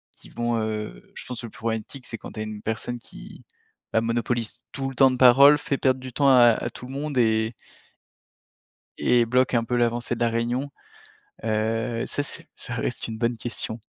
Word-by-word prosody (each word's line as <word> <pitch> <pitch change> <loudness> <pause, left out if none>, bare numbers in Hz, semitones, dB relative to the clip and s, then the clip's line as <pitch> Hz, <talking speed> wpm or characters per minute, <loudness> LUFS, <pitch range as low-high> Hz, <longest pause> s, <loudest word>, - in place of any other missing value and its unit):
qui - - -15
vont, 120 0 -1
heu, 105 - -5
je - - -7
pense, 125 -2 -6
le 115 - -6
plus - - -16
problématique, 115 +4 -4
c'est 115 - -4
quand - - -10
tu - - -7
as - - -1
une 110 -1 -7
personne 120 +2 -3
qui, - - -12 0.5
bah, 110 - +3
monopolise 115 0 -1
tout 135 0 -3
le 135 - -9
temps 135 +1 +6
de 125 - -2
parole, 135 +4 +8
fait 140 -1 -2
perdre 130 -1 +2
du 130 -1 -9
temps 140 +1 +3
à 120 -3 +7
à 115 +1 -2
tout 125 - -10
le 130 - -8
monde 145 0 -3
et 110 -1 +2 1.5
et 120 -1 +3
bloque 130 +2 +2
un 115 -1 +2
peu 125 +1 -1
l'avancée 120 0 0
de - - -10
la 120 -1 +2
réunion, 120 +4 -1 0.7
heu, 115 +1 -1
ça 145 - -2
c'est - - -8
ça - - -5
reste - - -3
une 110 -1 -5
bonne 115 0 0
question. 115 -1 -4
120 Hz, 205 wpm, -25 LUFS, 115-130 Hz, 1.5 s, parole